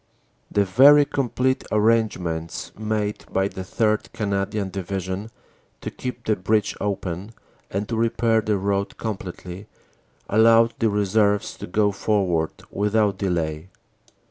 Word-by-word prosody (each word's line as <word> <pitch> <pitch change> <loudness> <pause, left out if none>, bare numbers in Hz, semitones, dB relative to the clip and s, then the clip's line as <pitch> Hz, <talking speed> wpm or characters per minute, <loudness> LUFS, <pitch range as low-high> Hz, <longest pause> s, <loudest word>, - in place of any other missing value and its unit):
"The 100 -1 +2
very 140 +9 +7
complete 130 -1 0
arrangements 105 -7 0
made 105 -1 -2
by 95 0 +1
the 95 - -7
3rd. 110 +3 0
Cana 100 -2 -1
dian 105 -3 -3
Division 95 +2 -4 0.5
to - - -5
keep 125 -2 -6
the 110 - +2
bridge 105 +2 0
open, 100 +1 -3 0.3
and 100 +2 -3
to 115 - -2
repair 115 0 +2
the 105 -1 0
road 100 +1 -1
completely, 95 -2 -6 0.6
allowed 115 +1 +5
the 115 -3 +3
reserves 105 0 +1
to - - -7
go 105 +3 +2
forward 95 -5 -1
without 105 -1 +1
delay. 85 -3 -2
105 Hz, 125 wpm, -23 LUFS, 95-110 Hz, 0.6 s, very